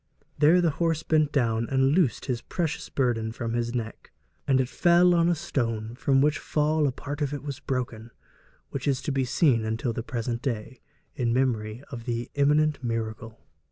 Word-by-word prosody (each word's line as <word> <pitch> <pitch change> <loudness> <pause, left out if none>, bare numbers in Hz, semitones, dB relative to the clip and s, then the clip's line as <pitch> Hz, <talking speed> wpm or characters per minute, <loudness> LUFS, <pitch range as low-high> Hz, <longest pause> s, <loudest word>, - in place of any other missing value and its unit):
There 160 +5 +6
the 170 -2 +2
horse 165 -2 +1
bent 155 -2 +2
down 115 -4 0
and 135 0 +3
loosed 160 -5 +2
his 125 -3 -2
precious 165 -4 -3
burden 115 -4 0
from 115 0 -4
his 120 0 -1
neck, 115 -2 -5 0.4
'and 135 -1 +4
it 130 - +1
fell 175 +5 +4
on 170 0 +3
a 175 - +2
stone, 115 -7 -2
from 135 +2 +2
which 150 +1 +2
fall 150 0 +1
a - - 0
part 145 +3 -6
of 145 0 -1
it 140 - -7
was 140 -3 -5
broken, 120 -3 -4 0.6
which 140 +1 -4
is 135 -2 +2
to - - -2
be 135 -1 0
seen 125 -4 +2
until 110 +2 -2
the 115 - -3
present 120 -1 -3
day, 125 -1 -4 0.3
in 120 -3 -1
memory 120 -2 0
of 120 -3 -7
the 120 -1 -3
eminent 150 0 +2
miracle.' 115 -1 -4
130 Hz, 190 wpm, -26 LUFS, 115-150 Hz, 0.6 s, There